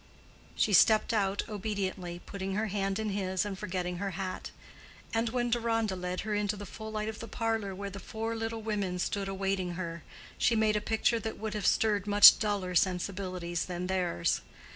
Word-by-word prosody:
She 210 - +2
stepped 215 +3 +5
out 200 -2 +1
obediently, 195 -4 -3
putting 195 -1 -4
her 215 +1 0
hand 195 0 -1
in 220 -1 -2
his 190 -1 -1
and 205 -2 -3
forgetting 180 -2 -3
her 200 +2 -2
hat; 190 -1 -4 0.6
and 225 +1 +1
when 240 0 -1
Deronda 225 -3 +1
led 180 0 -3
her 215 0 -3
into 205 0 0
the 205 0 -7
full 220 +2 -8
light 215 0 -2
of 220 0 -5
the 230 - -6
parlor 225 -5 -2
where 200 +1 -5
the 195 - -7
four 225 +3 -4
little 225 0 -3
women 205 -4 -1
stood 195 +2 -1
awaiting 195 -2 -1
her, 170 -2 -5 0.4
she 235 - +3
made 215 -1 +3
a 210 - +1
picture 225 +2 +1
that 220 0 -5
would 220 -1 -4
have 210 -3 -1
stirred 210 -2 +2
much 205 0 +9
duller 200 -4 -1
sensibilities 180 -1 -1
than 180 0 -4
theirs. 180 - 0
200 Hz, 185 wpm, -30 LUFS, 185-220 Hz, 0.6 s, much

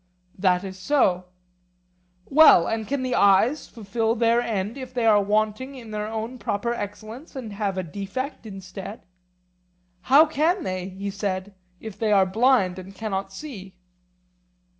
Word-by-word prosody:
That 180 -1 +2
is 190 -1 -8
so. 185 -6 +2 1.0
Well, 295 - +7
and 220 -1 -2
can 275 -1 -2
the 255 -1 -1
eyes 200 +9 +3
fulfil 225 +1 -2
their 235 0 +3
end 215 -1 -2
if 260 -2 -9
they 240 -2 0
are 210 -2 +5
wanting 215 +6 -1
in 230 -4 -10
their 210 0 -3
own 225 +3 -5
proper 235 +3 -2
excellence 220 - -8
and 235 -6 -6
have 200 -2 -2
a 185 - -1
defect 205 - -5
instead? 195 +2 -9 1.0
How 290 +4 +8
can 320 +4 0
they, 185 -3 -4
he 195 +1 -5
said, 195 -1 -3 0.3
if 215 -3 -9
they 220 -2 +1
are 195 -2 +5
blind 200 -2 +2
and 190 +1 -11
cannot 195 -3 -3
see? 195 -5 -9
215 Hz, 150 wpm, -24 LUFS, 195-245 Hz, 1.0 s, How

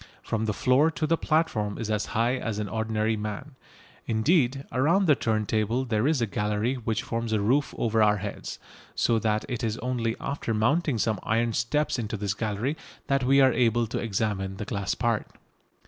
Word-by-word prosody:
From 110 0 -1
the 110 - 0
floor 130 - +4
to 160 -1 -2
the 165 - +3
platform 155 -12 0
is 110 -2 -3
as 105 0 -1
high 120 +3 +2
as 115 -4 -3
an 105 -1 -2
ordinary 110 +1 -1
man. 105 +7 -5 0.6
Indeed 135 +3 +2
around 165 +10 +3
the 155 - +6
turntable 110 +1 0
there 115 +1 +1
is 150 -5 +2
a - - +3
gallery 105 +3 -1
which 115 -3 -2
forms 115 -1 -3
a 110 - +2
roof 130 +8 +1
over 115 -1 +1
our 105 -1 +4
heads, 100 +1 -6 0.4
so 115 -1 +2
that 110 -1 0
it 125 -1 -4
is 110 -1 -1
only 120 -2 -1
after 140 -5 -3
mounting 135 +5 +1
some 110 -2 0
iron 115 +1 0
steps 135 +5 0
on 115 - -2
to 110 - -4
this 100 -1 -1
gallery 110 +7 -2 0.3
that 135 -1 +1
we 135 +2 +5
are 130 -2 +5
able 120 -1 +2
to 110 - -3
examine 100 -3 -2
the 105 - -4
glass 100 -2 -2
part. 115 -2 0
115 Hz, 195 wpm, -27 LUFS, 105-130 Hz, 0.6 s, the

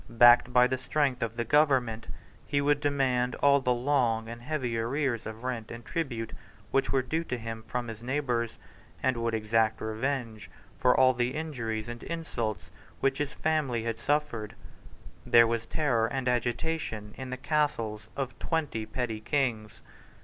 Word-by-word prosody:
Backed 120 +1 +7
by 125 0 +6
the 130 0 -1
strength 135 -1 0
of 115 0 -2
the 120 - -1
Government, 125 -5 +2 0.4
he 145 - +1
would 145 +1 +3
demand 130 -4 +1
all 140 0 +4
the 125 - +1
long 120 -3 +1
and 120 +1 -7
heavy 125 -3 -2
arrears 120 +1 -1
of 110 +2 -8
rent 120 -4 -3
and 120 0 -8
tribute 120 -9 -3 0.4
which 135 0 +2
were 135 -1 +2
due 160 +6 -1
to 125 - -3
him 115 -1 -6
from 125 -1 -3
his 115 -1 -7
neighbours, 125 -3 -1 0.5
and 130 -1 +2
would 115 -1 -1
exact 110 0 +1
revenge 110 -1 -3 0.3
for 125 0 +3
all 130 0 +6
the 125 +2 -1
injuries 115 -9 -3
and 120 0 -6
insults 120 -10 -4 0.3
which 135 0 +1
his 145 -1 -2
family 145 -8 0
had 115 -1 -3
suffered. 145 -7 -1 0.7
There 115 0 +7
was 115 0 -1
terror 125 -8 +1
and 130 +1 -3
agitation 120 -3 -1
in 130 -1 -7
the 130 - -4
castles 115 -8 -1
of 130 -3 -4
twenty 145 -10 -2
petty 120 -4 -3
kings. 115 -5 -1
125 Hz, 165 wpm, -29 LUFS, 115-140 Hz, 0.7 s, Backed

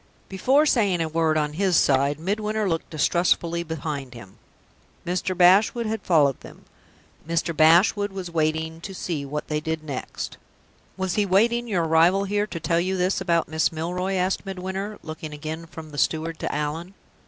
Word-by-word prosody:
Before 260 +10 +3
saying 205 - +2
a 165 - 0
word 160 0 +1
on 150 -1 -1
his 185 +1 +2
side, 140 +2 +2
Midwinter 210 +4 -1
looked 165 -3 -2
distrustfully 170 +1 +1
behind 150 -5 -5
him. 100 -5 -13 0.7
Mr. 180 +1 -2
Bashwood 200 +6 +5
had 220 -1 -2
followed 145 -8 +3
them. - - -14 0.6
Mr. 170 0 0
Bashwood 180 +6 +4
was 190 -3 -6
watching 160 0 -1
to 195 +2 -7
see 160 -6 -3
what 150 +2 -5
they 150 -1 -1
did 160 0 -3
next. 140 -4 -6 0.6
"Was 190 -2 -1
he 210 - +1
waiting 235 +5 +2
your 185 -6 0
arrival 165 +4 +4
here 205 +1 0
to 170 - -6
tell 165 +1 +1
you 185 +2 -1
this 185 +1 0
about 170 -3 +1
Miss 160 0 +1
Milroy?" 180 +4 -3
asked 185 +1 0
Midwinter, 195 +2 -5
looking 155 -1 -7
again 155 +3 -6
from 160 -1 -10
the 145 - -5
steward 160 0 -1
to - - -3
Allan. 155 +6 -4
170 Hz, 170 wpm, -24 LUFS, 155-190 Hz, 0.7 s, Bashwood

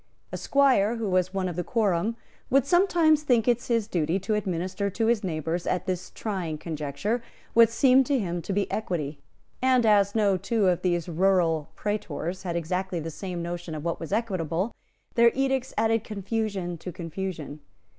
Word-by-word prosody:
A - - -3
squire 255 -6 +3
who 225 -2 -3
was 185 0 +2
one 190 -1 -1
of 175 - -4
the 175 - -2
quorum 210 0 +1 0.3
would 275 +1 +4
sometimes 335 -2 +4
think 245 -6 +2
it 240 -1 +3
his 230 -4 0
duty 170 -3 0
to 215 - -1
administer 190 0 -1
to 225 +4 -1
his 225 -2 +2
neighbours, 165 0 -2
at 180 0 0
this 180 -1 -3
trying 185 -8 -4
conjuncture, 160 - -3 0.3
what 230 -1 +7
seemed 255 +2 +4
to 280 - +2
him 175 -6 -2
to 195 - -5
be 200 +1 0
equity; 155 -9 -3 0.4
and 255 -2 +4
as 205 -1 +4
no 205 -3 +3
two 205 +2 +1
of 175 - 0
these 175 -2 0
rural 170 -3 +2
praetors 205 -3 -3
had 175 -3 -3
exactly 180 +2 -2
the 165 +1 -5
same 180 0 -5
notion 175 -1 -5
of 150 +1 -6
what 170 - -1
was 165 - -7
equitable, 190 -3 -1 0.4
their 235 -1 +6
edicts 265 -1 0
added 225 0 +2
confusion 200 -4 -3
to 180 - -6
confusion. 165 -3 -5
190 Hz, 175 wpm, -26 LUFS, 175-225 Hz, 0.4 s, what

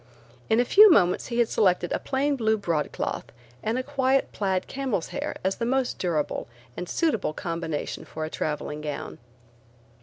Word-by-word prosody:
In 220 - +4
a 245 - +3
few 420 - +8
moments 180 - +4
he 235 - -3
had 240 -1 +4
selected 180 -5 +2
a - - 0
plain 280 +2 0
blue 220 -3 +2
broadcloth 170 -7 -2 0.4
and 225 +3 -1
a 255 - -1
quiet 270 -1 +1
plaid 190 -2 -1
camel's 260 -10 -2
hair - - -4
as 190 +1 0
the - - -3
most 260 0 0
durable 165 -5 -1 0.3
and 180 - -5
suitable 260 - 0
combination 165 -2 -4
for 155 0 -5
a - - -5
traveling 150 0 -3
gown. 150 -2 -5
205 Hz, 170 wpm, -26 LUFS, 170-260 Hz, 0.4 s, few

